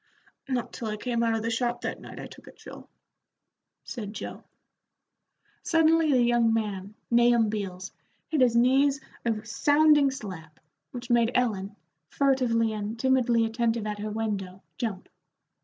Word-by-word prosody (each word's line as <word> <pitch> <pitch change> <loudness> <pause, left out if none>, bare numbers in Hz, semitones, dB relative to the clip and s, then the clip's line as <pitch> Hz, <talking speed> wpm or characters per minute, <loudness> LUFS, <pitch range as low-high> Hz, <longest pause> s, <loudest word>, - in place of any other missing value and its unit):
"Not 250 -3 -2
till 230 - -5
I 215 0 -3
came 235 +1 -2
out 230 -1 +2
of 220 - -3
the 230 - -1
shop 240 +1 -1
that - - -4
night - - -10
I - - -6
took - - -13
the - - -12
chill," - - -13 0.9
said 210 -5 -6
Joe. - - -7 1.2
Suddenly 325 -1 +3
the 250 -3 +4
young 240 -1 +3
man, 210 -2 -3 0.2
Nahum 235 -2 +4
Beals, 190 -3 -5 0.4
hit 305 -4 0
his 245 -2 +4
knees 270 +4 +4 0.3
a 220 -2 -1
sounding 295 +4 +4
slap, 185 - -8 0.3
which 245 +4 -7
made 235 -1 +4
Ellen, 210 -5 0 0.3
furtively 245 -5 +1
and 215 +1 -4
timidly 245 -3 +2
attentive 225 -1 -1
at 210 -1 -4
her 215 +1 -4
window, 200 -4 -4 0.2
jump. 210 -6 -3
230 Hz, 150 wpm, -27 LUFS, 215-250 Hz, 1.2 s, the